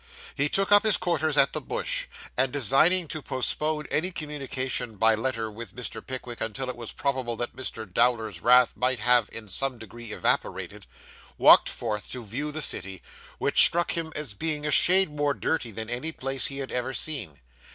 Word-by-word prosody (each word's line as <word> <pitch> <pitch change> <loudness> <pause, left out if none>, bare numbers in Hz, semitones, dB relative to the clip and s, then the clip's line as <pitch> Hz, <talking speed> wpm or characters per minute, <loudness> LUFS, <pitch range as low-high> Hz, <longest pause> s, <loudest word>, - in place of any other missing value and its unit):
He 145 +1 0
took 195 +4 0
up 205 0 +8
his 215 -2 +2
quarters 160 -4 0
at 135 - +4
the - - -1
Bush, - - -3 0.3
and 130 0 +2
designing 145 - +3
to 155 - -5
postpone 150 +3 -2
any 175 +4 +1
communication 130 -6 -4
by 110 +2 +5
letter 115 -1 -2
with 110 -2 -9
Mr. 125 -1 -6
Pickwick 125 -2 -7
until 130 +4 -3
it - - -11
was 120 -2 -8
probable 130 -4 -2
that 120 +1 -4
Mr. 115 -3 -3
Dowler's 110 -2 0
wrath 125 +4 +5
might 125 +1 +1
have 120 -3 +3
in 115 -2 -7
some 130 +7 -2
degree 115 +1 -10
evaporated, - - -2 0.5
walked - - +7
forth 105 -1 -4
to 125 -3 -7
view 140 +9 -4
the 155 0 -3
city, 95 -7 -2 0.3
which - - +5
struck 175 +1 +3
him 165 -1 -3
as 145 -8 -2
being 150 +7 -3
a 150 - -1
shade 185 +4 +5
more 145 -1 -1
dirty 145 -7 -2
than 110 +1 -6
any 125 +7 -3
place 135 -3 -1
he 135 - -5
had 135 -1 -5
ever 125 +1 -2
seen. 115 - -2
130 Hz, 185 wpm, -26 LUFS, 115-150 Hz, 0.5 s, up